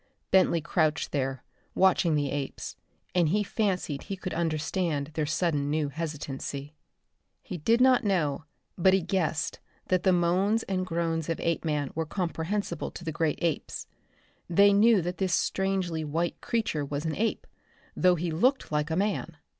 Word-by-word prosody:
Bentley 185 -3 +4
crouched 155 -1 0
there, 135 -2 -2 0.3
watching 185 -3 +4
the 145 -2 0
apes, 140 -1 -4 0.4
and 175 -4 +3
he 210 +5 +2
fancied 185 -9 -1
he 195 - -4
could 185 0 -5
understand 160 -2 -1
their 155 -2 -1
sudden 155 -3 0
new 150 -1 0
hesitancy. 145 -2 -5 0.7
He 180 - -6
did 225 +10 +3
not 255 0 +5
know, 160 -7 0 0.3
but 185 +2 +5
he 190 - +2
guessed 165 -5 -1 0.3
that 185 -1 +3
the 190 - +3
moans 185 +5 +2
and 185 -1 -2
groans 165 -2 -1
of 165 - -1
Apeman 150 -4 -1
were 160 0 -2
comprehensible 175 0 -2
to - - -10
the 160 - -1
great 160 -1 0
apes. 165 -4 -2 0.6
They 200 +4 +6
knew 210 -2 +5
that 180 +1 -4
this 190 -2 +2
strangely 190 -5 0
white 165 +3 -2
creature 220 -10 -1
was 145 +2 -4
an 160 - -1
ape, 225 +1 -1 0.5
though 180 -1 +4
he 170 0 -2
looked 250 - +1
like 150 +1 0
a 160 - 0
man. 185 -4 -1
170 Hz, 160 wpm, -28 LUFS, 155-190 Hz, 0.7 s, They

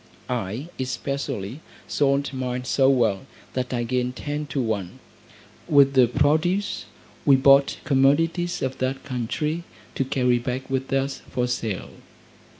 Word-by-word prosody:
I, 120 - -3
especially, 130 -3 -3 0.3
sold 140 0 +1
mine 125 -1 -3
so 135 +1 +3
well, 120 -3 +2 0.3
that 125 -1 -2
I 120 -2 -1
gained 125 +1 -1
ten 150 +2 -4
to 140 - -3
one. 105 -7 -2 0.7
With 140 -2 +6
the 130 -2 +6
produce 160 - +1 0.4
we 140 - +6
bought 135 +1 +5
commodities 160 +6 +2
of 130 0 -3
that 130 +1 -2
country, 150 +7 -2 0.3
to - - 0
carry 125 -2 +1
back 125 +2 -4
with 135 +1 -2
us 135 0 -1
for 125 - 0
sale. 115 -5 -3
130 Hz, 135 wpm, -24 LUFS, 125-140 Hz, 0.7 s, With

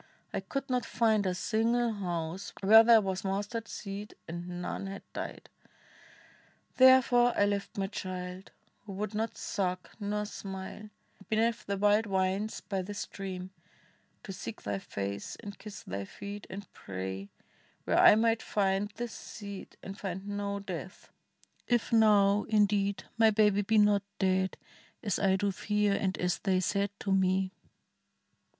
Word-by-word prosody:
I - - 0
could 275 0 -4
not 250 -2 0
find 220 -3 +2
a 180 - 0
single 230 +4 +1
house 175 -2 -4
Where 220 +3 +9
there 225 -1 +7
was 190 -2 -2
mustard 205 +4 -2
seed 200 0 -7
and 170 +2 -6 0.2
none 195 - -4
had 195 +1 -7
died! - - -6 1.3
Therefore 255 -2 +6
I 205 - +5
left 205 0 -2
my 195 - 0
child 185 -1 -6 0.2
— - - -39
who 200 - -6
would 205 +2 -3
not 220 +2 -2
suck 185 -2 -2
Nor 210 0 -1
smile 195 +1 -7 0.2
— 200 - -22
beneath 225 +2 +1
the 200 0 -1
wild 210 +2 +3
vines 190 +2 0
by 195 -2 -2
the 205 +3 -6
stream, 190 -2 -5 0.7
To 195 - -6
seek 115 - -7
thy 100 -1 -2
face 100 +1 -5
and 200 -1 -9
kiss 210 -1 -9
thy 100 +1 -4
feet, 200 - -8
and 200 +1 -7
pray 95 +1 -6 0.5
Where - - +2
I - - +9
might 225 +1 +2
find 195 0 0
this 240 -1 -4
seed 200 -2 -9
and 195 +1 -7
find 190 0 -5
no 205 0 -2
death, 185 -1 -7 0.6
If 240 -1 +1
now, 210 -2 +5
indeed, 205 -2 +2 0.2
my 225 -1 +7
baby 210 -1 +4
be 220 +2 +2
not 205 -1 +5 0.2
dead, 190 -1 +1 0.5
As 205 -5 0
I 190 -2 +3
do 200 +1 +1
fear, 210 +1 +1
and 190 -1 0
as 180 0 0
they 190 -2 +1
said 200 +2 0
to 195 - -2
me." 190 0 +2
200 Hz, 155 wpm, -31 LUFS, 190-215 Hz, 1.3 s, Where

